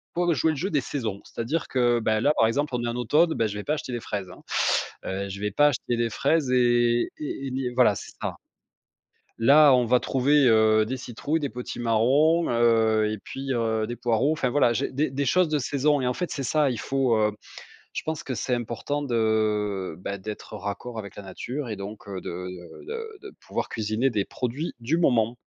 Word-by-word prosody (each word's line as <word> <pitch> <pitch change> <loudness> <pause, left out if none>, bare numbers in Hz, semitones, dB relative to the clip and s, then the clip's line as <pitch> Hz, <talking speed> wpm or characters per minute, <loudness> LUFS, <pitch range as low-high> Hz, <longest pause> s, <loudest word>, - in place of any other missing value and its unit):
faut 175 -1 +2
jouer 160 +2 +2
le 150 - -4
jeu 190 +8 -2
des 145 - +2
saisons, 110 -9 -4
c'est-à-dire 145 +8 -3
que, 120 -2 +2
ben, 110 0 +1
là, 145 +3 +3
par 110 - +5
exemple, 140 +1 -1
on 120 - -2
est - - -1
en 120 - -3
automne, 155 +8 +3
beh, 115 - +1
je 105 - -6
vais 105 - -5
pas 150 - 0
acheter 130 -4 -6
des 120 - -3
fraises, 100 -3 -4
hein, - - -13 0.6
heu, 100 +1 -3
je 100 +1 -6
vais 105 0 -1
pas 145 +8 +4
acheter 120 -2 -2
des 120 -1 +1
fraises 140 +2 +1
et 120 -1 +3
et 140 -2 -4
et - - -5
ni 130 -1 -2
voilà, 120 -5 +5
c'est - - -8
ça. - - -3 1.0
Là, 145 +4 +7
on 125 -1 +2
va 125 +2 +4
trouver, 140 +2 +3
heu, 110 -1 +5
des 130 +4 -3
citrouilles, 130 +6 -3
des 140 -3 -2
potimarrons, 125 +7 +1
heu, 110 -2 +3
et 110 - -4
puis, 135 +5 -5
heu, 110 -2 0
des 120 +2 -5
poireaux, 120 +4 +1
enfin, 135 -5 0
voilà, 120 -3 +3
j'ai 135 - -1
des 140 +1 0
des 140 +1 -1
choses 185 +5 +3
de 150 -1 0
saison 145 +1 +1
et 125 - 0
en 125 - +1
fait, 180 - -3
c'est 140 - -3
ça, 145 +1 +2
il 115 - -4
faut, 135 -4 +1
heu, 105 -1 +2 0.6
je - - -3
pense 160 -1 -3
que 130 - -4
c'est 125 +1 -1
important 120 +5 -3
de, 110 - 0
ben, 100 +1 -5
d'être 105 +2 -7
raccord 105 +4 -5
avec 100 -2 -7
la 100 - -7
nature 120 +8 -5
et 110 - -3
donc, 100 +1 -8
heu, 95 -2 -5
de 90 0 -6
de 90 -1 -10
de 450 -2 -6
de 410 - -10
pouvoir - - -3
cuisiner 110 +4 0
des 105 -4 -1
produits 130 +7 -4
du 135 +8 0
moment. 120 -7 +2
120 Hz, 220 wpm, -25 LUFS, 110-140 Hz, 1.0 s, Là